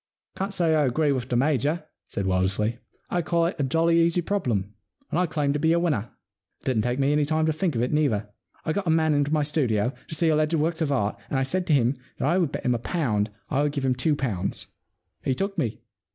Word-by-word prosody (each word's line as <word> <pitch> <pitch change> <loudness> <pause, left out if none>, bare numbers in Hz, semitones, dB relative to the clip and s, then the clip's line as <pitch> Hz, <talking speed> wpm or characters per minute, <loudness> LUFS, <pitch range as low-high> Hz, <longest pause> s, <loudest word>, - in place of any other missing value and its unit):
* - - -55
Can't 195 +1 -2
say 170 -4 +1
I 150 -2 +3
agree 145 +4 +2
with 130 -2 -2
the 125 - 0
Major,' 145 +4 +1 0.2
said 100 - -3
Wildersley. 95 +5 +1 0.2
* - - -41
I 175 - +1
call 170 +1 +1
it 170 - -1
a - - +2
jolly 165 +5 +3
easy 170 +1 +2
problem, 115 - -1 0.4
and - - +1
I 180 - +2
claim 145 -3 0
to 150 - -1
be 160 +2 +3
a 170 - +3
winner. 140 - 0 0.5
It - - -26
didn't 125 -5 +2
take 120 +3 -1
me 140 +1 +2
any 150 0 +3
time 155 +2 +1
to 160 - +2
think 165 -2 -1
of 115 - +1
it, 125 - -1
either. 115 -9 +1 0.4
I 155 - 0
got 190 0 -2
a - - +3
man 160 -1 +3
into 145 0 +1
my 155 -1 +2
studio, 125 -6 0
to 160 - -5
see 165 +1 +2
alleged 155 +1 +2
works 160 +1 0
of 150 -3 +1
art, 105 -7 0
and 135 - 0
I 135 - +2
said 180 +7 -1
to 155 - +3
him 130 -1 +3 0.2
that - - 0
I 175 +5 +3
would 165 -6 +1
bet - - -5
him 125 - +3
a 120 - -1
pound 115 - 0 0.2
I 140 -1 +2
would 145 -1 0
give 140 -2 -2
him 130 - +3
two 135 +5 +1
pounds. 105 -10 -3 0.6
He 130 - +1
took 195 +6 -2
me. 125 -10 -2
145 Hz, 260 wpm, -25 LUFS, 125-165 Hz, 0.6 s, I